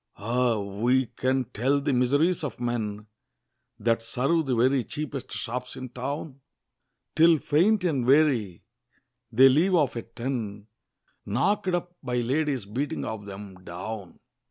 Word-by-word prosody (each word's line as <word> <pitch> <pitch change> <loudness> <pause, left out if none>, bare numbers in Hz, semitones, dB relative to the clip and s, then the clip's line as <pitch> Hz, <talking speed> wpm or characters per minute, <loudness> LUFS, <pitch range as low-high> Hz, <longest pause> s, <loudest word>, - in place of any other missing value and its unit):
Ah! 120 +2 +1
who 110 +6 +1
can 130 0 +1
tell 125 +4 0
the 140 0 0
miseries 145 +8 +2
of 140 -6 -4
men 110 -4 -3 0.7
That 115 -1 +1
serve 135 +7 0
the 130 - +1
very 130 +2 +3
cheapest 145 0 -5
shops 125 +2 -4
in 130 -1 -7
town? 140 +3 -5 0.7
Till 165 +1 +6
faint 180 +8 +2
and 150 -8 +1
weary, 130 - +3 0.7
they 130 +4 +7
leave 165 +8 +4
off 145 -7 +2
at 115 0 -8
ten, 115 -5 -4 0.6
Knock'd 185 - +1
up 175 0 -4
by 125 -3 -3
ladies 135 0 0
beating 130 +8 -3
of 105 -2 -6
'em 95 -2 -10
down! 95 +2 -7
125 Hz, 135 wpm, -26 LUFS, 115-145 Hz, 0.7 s, they